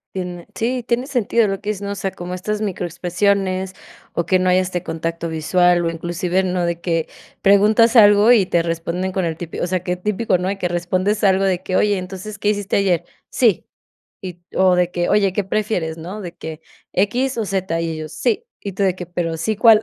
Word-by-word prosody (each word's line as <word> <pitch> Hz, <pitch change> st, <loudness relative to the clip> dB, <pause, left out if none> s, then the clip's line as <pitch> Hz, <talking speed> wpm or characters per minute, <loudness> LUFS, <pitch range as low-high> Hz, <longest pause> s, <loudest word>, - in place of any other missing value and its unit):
Tiene 180 Hz, -2 st, -5 dB
Sí, 245 Hz, +2 st, -1 dB
tiene 240 Hz, +1 st, 0 dB
sentido 235 Hz, -4 st, +2 dB
lo 195 Hz, -1 st, -2 dB
que 210 Hz, -, -4 dB
dices 205 Hz, -2 st, -6 dB
¿no? 200 Hz, 0 st, -4 dB
O -, -, -3 dB
sea, 195 Hz, 0 st, -3 dB
como 175 Hz, 0 st, -7 dB
estas 210 Hz, +4 st, -3 dB
micro 195 Hz, -4 st, -2 dB
expresiones, 185 Hz, +2 st, 0 dB, 0.4 s
o 170 Hz, -, -1 dB
que 185 Hz, -, +3 dB
no 185 Hz, 0 st, +2 dB
haya 180 Hz, +1 st, +4 dB
este 180 Hz, -1 st, -3 dB
contacto 165 Hz, 0 st, -3 dB
visual, 175 Hz, +2 st, +2 dB
o -, -, +1 dB
inclusive, 175 Hz, +3 st, -1 dB
¿no?, 180 Hz, -1 st, 0 dB
de 170 Hz, 0 st, -2 dB
que 165 Hz, -2 st, -1 dB, 0.3 s
preguntas 210 Hz, +4 st, +5 dB
algo, 205 Hz, 0 st, +7 dB
y 220 Hz, -6 st, +5 dB
te 170 Hz, -2 st, +1 dB
responden 170 Hz, +2 st, -2 dB
con 185 Hz, -1 st, -1 dB
el 160 Hz, -1 st, -3 dB
típi 170 Hz, -1 st, -6 dB
O -, -, -1 dB
sea, 180 Hz, 0 st, -1 dB
que 180 Hz, 0 st, -1 dB
típico, 210 Hz, +1 st, 0 dB
¿no? 180 Hz, +1 st, -3 dB
De 195 Hz, +1 st, -2 dB
que 180 Hz, -, -1 dB
respondes 185 Hz, +4 st, -1 dB
algo, 195 Hz, -1 st, +4 dB
de 185 Hz, -2 st, +1 dB
que: 185 Hz, 0 st, -3 dB
"Oye, 205 Hz, 0 st, +3 dB
entonces, 190 Hz, +3 st, -7 dB
¿qué 205 Hz, -, +1 dB
hiciste 205 Hz, -2 st, 0 dB
ayer?". 190 Hz, -4 st, +1 dB, 0.2 s
"Sí". 225 Hz, -8 st, +2 dB, 0.6 s
Y, 180 Hz, -2 st, -8 dB
o 185 Hz, -1 st, +4 dB
de 180 Hz, 0 st, +1 dB
que: 175 Hz, -1 st, -1 dB
"Oye, 200 Hz, -2 st, +3 dB
¿qué 205 Hz, -, 0 dB
prefieres, 190 Hz, -5 st, -2 dB
no? 180 Hz, +6 st, -7 dB
"De 175 Hz, -3 st, -7 dB
que 160 Hz, 0 st, -8 dB, 0.3 s
¿Equis 245 Hz, +7 st, 0 dB
o 225 Hz, -, -1 dB
zeta?" 190 Hz, -4 st, -1 dB
Y -, -, -1 dB
y -, -, -2 dB
ellos: 155 Hz, -1 st, -6 dB
"Sí". 215 Hz, +8 st, -1 dB, 0.2 s
Y 200 Hz, -, -5 dB
tú, 200 Hz, -, -1 dB
de 190 Hz, -2 st, +2 dB
que: 180 Hz, -, -6 dB
"Pero, 165 Hz, -1 st, -3 dB
sí, 215 Hz, +7 st, -1 dB
¿cuál?". 220 Hz, 0 st, +6 dB
185 Hz, 225 wpm, -20 LUFS, 175-205 Hz, 0.6 s, algo